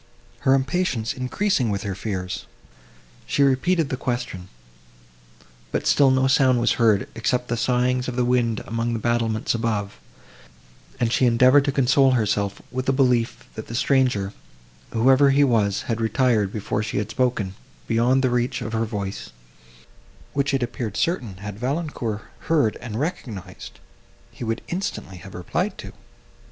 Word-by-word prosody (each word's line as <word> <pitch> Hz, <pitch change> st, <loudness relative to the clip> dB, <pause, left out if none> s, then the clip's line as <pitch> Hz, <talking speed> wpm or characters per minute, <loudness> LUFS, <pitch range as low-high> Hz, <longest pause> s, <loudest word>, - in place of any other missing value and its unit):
Her 130 Hz, -, +4 dB
impatience 130 Hz, -4 st, 0 dB
increasing 130 Hz, -, 0 dB
with 100 Hz, -1 st, -2 dB
her 100 Hz, -, -3 dB
fears, 95 Hz, -1 st, -4 dB, 0.8 s
she 140 Hz, -, +2 dB
repeated 140 Hz, +4 st, +2 dB
the 130 Hz, -, -2 dB
question; 120 Hz, -8 st, -4 dB, 1.2 s
but -, -, -2 dB
still 140 Hz, -2 st, +5 dB
no 130 Hz, 0 st, +3 dB
sound 130 Hz, -2 st, +4 dB
was 120 Hz, -, +2 dB
heard, 110 Hz, -4 st, +3 dB
except 125 Hz, +2 st, -1 dB
the 120 Hz, -, 0 dB
sighings 125 Hz, +1 st, +1 dB
of 125 Hz, -, -3 dB
the 125 Hz, -1 st, +1 dB
wind 120 Hz, -3 st, +1 dB
among 115 Hz, +1 st, -2 dB
the -, -, -1 dB
battlements 115 Hz, -1 st, 0 dB
above; 105 Hz, -, -2 dB, 1.0 s
and 115 Hz, -1 st, +1 dB
she 130 Hz, -, +3 dB
endeavoured 130 Hz, +4 st, +5 dB
to 140 Hz, -, +1 dB
console 135 Hz, 0 st, +4 dB
herself 105 Hz, -4 st, 0 dB
with 130 Hz, +1 st, -2 dB
a -, -, +5 dB
belief, 125 Hz, -3 st, +1 dB
that 110 Hz, -, -8 dB
the 115 Hz, -, -6 dB
stranger, 125 Hz, -7 st, +1 dB, 0.6 s
whoever 130 Hz, +4 st, +5 dB
he 140 Hz, +1 st, +4 dB
was, 110 Hz, -7 st, +2 dB
had 115 Hz, -1 st, -2 dB
retired, 110 Hz, -3 st, +2 dB
before 105 Hz, 0 st, -2 dB
she 105 Hz, -1 st, -3 dB
had 105 Hz, +1 st, -2 dB
spoken, 120 Hz, -7 st, 0 dB, 0.3 s
beyond 125 Hz, +4 st, +2 dB
the 130 Hz, -, +2 dB
reach 120 Hz, 0 st, 0 dB
of 110 Hz, -, -5 dB
her 115 Hz, 0 st, +1 dB
voice, 100 Hz, -3 st, -5 dB, 1.0 s
which, 140 Hz, 0 st, +1 dB
it 135 Hz, -2 st, +1 dB
appeared 120 Hz, -4 st, -4 dB
certain, 125 Hz, -, -1 dB
had 100 Hz, +1 st, -7 dB
Valancourt 125 Hz, -5 st, -3 dB, 0.3 s
heard 145 Hz, -10 st, +3 dB
and 115 Hz, -2 st, -6 dB
recognised, 125 Hz, -, -6 dB, 0.5 s
he -, -, -9 dB
would 115 Hz, 0 st, -2 dB
instantly 170 Hz, -, -4 dB
have 95 Hz, +3 st, -11 dB
replied 90 Hz, -, -2 dB
to. -, -, -9 dB
120 Hz, 155 wpm, -23 LUFS, 110-130 Hz, 1.2 s, still